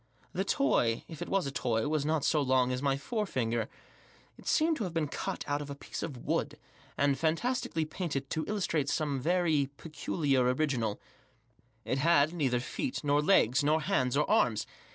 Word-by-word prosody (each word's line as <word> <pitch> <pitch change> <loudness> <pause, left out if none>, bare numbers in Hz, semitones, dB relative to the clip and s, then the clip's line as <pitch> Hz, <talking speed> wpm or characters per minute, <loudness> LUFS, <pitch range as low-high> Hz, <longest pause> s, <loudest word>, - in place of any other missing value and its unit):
The 190 - 0
toy, 125 - +1
if 160 -3 -10
it - - -4
was 195 -4 +1
a 140 - -3
toy, 120 -2 0
was 150 -1 0
not 155 -2 +1
so 150 - +3
long 130 -2 +2
as 125 0 -2
my 140 -1 +1
fore 210 - -2
finger. 115 -6 -1 0.7
It - - -15
seemed 320 0 +3
to - - -2
have 170 -2 -6
been 160 -2 +1
cut - - -4
out 145 0 0
of 145 - -7
a 140 - -5
piece - - -7
of 130 -7 -6
wood, 150 -2 -1 0.4
and 140 -1 +2
fantastically 165 0 0
painted 155 -4 -3
to 160 - -1
illustrate 175 -9 0
aorce 145 -3 -1
very 160 -3 +2
peculiar 150 -3 0
original 125 -8 0 0.9
It 135 - -1
had 155 +1 +4
neither 135 -7 +1
test 255 - -4
nor 145 0 +3
leg 140 - +4
nor 150 +2 +3
hands 130 -3 +1
or 150 - +2
arms. 120 - +2
145 Hz, 185 wpm, -31 LUFS, 135-165 Hz, 0.9 s, had